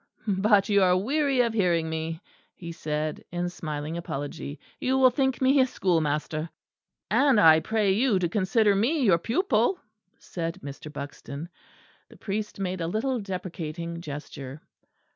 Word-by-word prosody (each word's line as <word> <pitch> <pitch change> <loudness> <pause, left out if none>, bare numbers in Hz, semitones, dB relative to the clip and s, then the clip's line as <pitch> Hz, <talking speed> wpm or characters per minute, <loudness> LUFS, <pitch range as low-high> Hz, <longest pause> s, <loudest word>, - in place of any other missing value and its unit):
"But 200 0 +3
you 200 -2 +4
are 180 -1 +4
weary 270 +5 +1
of 235 -2 0
hearing 175 -6 +2
me!" 160 0 -4 0.3
he 170 -2 -8
said, 155 -1 -3
in 175 0 -2
smiling 155 -2 -5
apology. 145 -2 -5 0.2
"You 260 +1 +1
will 260 -1 +6
think 265 0 0
me 270 +2 +5
a 260 - +5
schoolmaster." 155 - -1 0.6
"And 275 -6 +4
I 160 -2 +7
pray 215 +2 +1
you 220 +1 +3
to 180 -1 +1
consider 205 +3 +2
me 265 +9 +1
your 185 -7 +4
pupil," 245 - +1 0.4
said 170 +1 -5
Mr. 145 +2 -8
Buxton. 145 +2 -7 0.6
The - - -16
priest 210 0 -4
made 185 -2 -2
a 165 - -1
little 240 +7 -1
deprecating 170 -4 -5
gesture. 145 -2 -8
185 Hz, 145 wpm, -26 LUFS, 160-225 Hz, 0.6 s, I